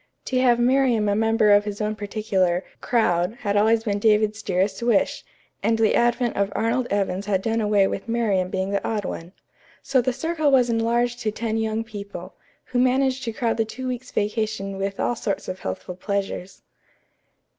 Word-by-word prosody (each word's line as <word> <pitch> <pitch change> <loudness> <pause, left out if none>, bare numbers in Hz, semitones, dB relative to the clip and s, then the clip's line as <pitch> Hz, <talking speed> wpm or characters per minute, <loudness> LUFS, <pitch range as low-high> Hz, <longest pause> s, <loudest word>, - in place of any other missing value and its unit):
To 255 - 0
have 240 -2 +4
Miriam 245 -3 +3
a 205 - +2
member 225 0 +3
of 205 0 +6
his 205 -1 -5
own 215 0 -1
particular 200 -4 0 0.2
"crowd" 180 -3 +1
had 205 -2 -1
always 220 +2 +3
been 205 -3 -1
David's 215 0 +2
dearest 190 +1 -1
wish, 235 -4 +1 0.4
and 225 - +2
the 225 -1 +3
advent 240 0 +1
of 200 0 0
Arnold 235 +3 0
Evans 200 -1 -1
had 190 -2 0
done 225 0 0
away 205 -2 +3
with 195 - -3
Miriam 205 -6 +1
being 190 +1 -2
the 200 - -1
odd 210 -3 -2
one. 170 0 -6 0.5
So 270 -2 +2
the 255 +2 0
circle 310 +3 0
was 250 -3 +4
enlarged 235 +1 +1
to 225 -3 -1
ten 220 +1 -3
young 220 0 -1
people, 205 -3 -8 0.3
who 250 - -1
managed 260 +1 +2
to 230 - -2
crowd 225 0 -1
the 225 - +2
two 255 +4 -6
weeks' 250 0 -4
vacation 210 -2 -2
with 195 0 -3
all 240 - 0
sorts 205 -3 -3
of 185 0 -5
healthful 95 - -5
pleasures. 195 -1 -4
220 Hz, 185 wpm, -23 LUFS, 200-240 Hz, 0.5 s, of